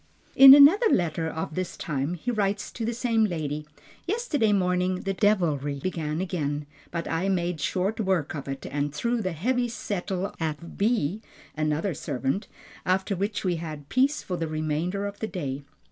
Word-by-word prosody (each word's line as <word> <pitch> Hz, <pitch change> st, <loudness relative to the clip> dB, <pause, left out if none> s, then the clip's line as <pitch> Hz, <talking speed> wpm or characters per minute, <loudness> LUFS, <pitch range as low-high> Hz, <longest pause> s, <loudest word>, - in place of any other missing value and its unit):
In 270 Hz, 0 st, +11 dB
another 320 Hz, +11 st, +7 dB
letter 165 Hz, -, +1 dB
of 160 Hz, 0 st, -4 dB
this 185 Hz, +2 st, -4 dB
time 145 Hz, +2 st, -2 dB
he 235 Hz, +9 st, -3 dB
writes 205 Hz, -2 st, -1 dB
to 235 Hz, -, -6 dB
the 235 Hz, -, -1 dB
same 230 Hz, -2 st, +2 dB
lady, 155 Hz, -5 st, -3 dB, 0.4 s
"Yesterday 350 Hz, -, +1 dB
morning 180 Hz, -1 st, +1 dB
the 195 Hz, -, -2 dB
devilry 160 Hz, -9 st, +1 dB
began 155 Hz, -2 st, -3 dB
again, 150 Hz, -6 st, -2 dB, 0.2 s
but 170 Hz, -1 st, -4 dB
I 165 Hz, +4 st, 0 dB
made 175 Hz, -4 st, -1 dB
short 190 Hz, +8 st, -1 dB
work 190 Hz, -7 st, 0 dB
of 140 Hz, -3 st, -6 dB
it, 135 Hz, 0 st, -5 dB
and 145 Hz, 0 st, -2 dB
threw 235 Hz, +7 st, 0 dB
the 185 Hz, -3 st, -2 dB
heavy 245 Hz, +9 st, 0 dB
settle 195 Hz, -4 st, -3 dB
at 160 Hz, +1 st, -4 dB
B 210 Hz, -3 st, 0 dB, 0.3 s
(another 155 Hz, +4 st, 0 dB
servant), 145 Hz, -, -2 dB, 0.4 s
after 190 Hz, +2 st, 0 dB
which 200 Hz, +3 st, -2 dB
we 175 Hz, -2 st, +1 dB
had 155 Hz, -3 st, -7 dB
peace 275 Hz, +4 st, +2 dB
for 180 Hz, -, -3 dB
the 165 Hz, -, -2 dB
remainder 155 Hz, +5 st, -2 dB
of 200 Hz, 0 st, -6 dB
the 220 Hz, -, -2 dB
day." 145 Hz, -9 st, -4 dB
180 Hz, 170 wpm, -26 LUFS, 155-210 Hz, 0.4 s, In